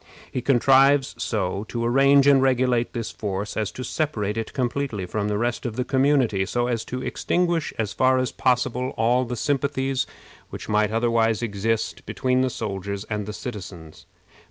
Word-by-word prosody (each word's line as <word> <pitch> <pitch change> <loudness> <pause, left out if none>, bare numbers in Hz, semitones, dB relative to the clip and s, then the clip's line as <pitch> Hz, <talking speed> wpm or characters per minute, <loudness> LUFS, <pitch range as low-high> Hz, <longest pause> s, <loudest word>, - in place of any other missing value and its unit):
He 125 - -2
contrives 135 +2 +4
so 100 -2 -2
to 115 +1 -3
arrange 135 +3 +5
and 140 -2 +6
regulate 125 -2 +2
this 115 -2 -4
force 100 0 -4
as 110 -2 -1
to 130 - -6
separate 110 -10 -2
it 115 -1 -4
completely 125 -5 -2
from 105 +3 -2
the 105 0 -1
rest 120 +2 -1
of 120 -3 -4
the 125 0 -1
community, 130 -8 +2
so 120 +3 0
as 120 -2 -1
to 125 +1 -5
extinguish 175 -2 0
as 110 -2 -2
far 130 +2 +3
as 130 -1 0
possible 125 0 0
all 120 +3 +2
the 125 0 -4
sympathies 135 0 -1 0.4
which - - -8
might 105 0 +2
otherwise 115 0 +1
exist 110 +1 -2
between 130 0 0
the 130 - +1
soldiers 100 -3 -4
and 105 -1 -2
the - - -3
citizens. 90 -9 -8
120 Hz, 170 wpm, -24 LUFS, 105-130 Hz, 0.4 s, and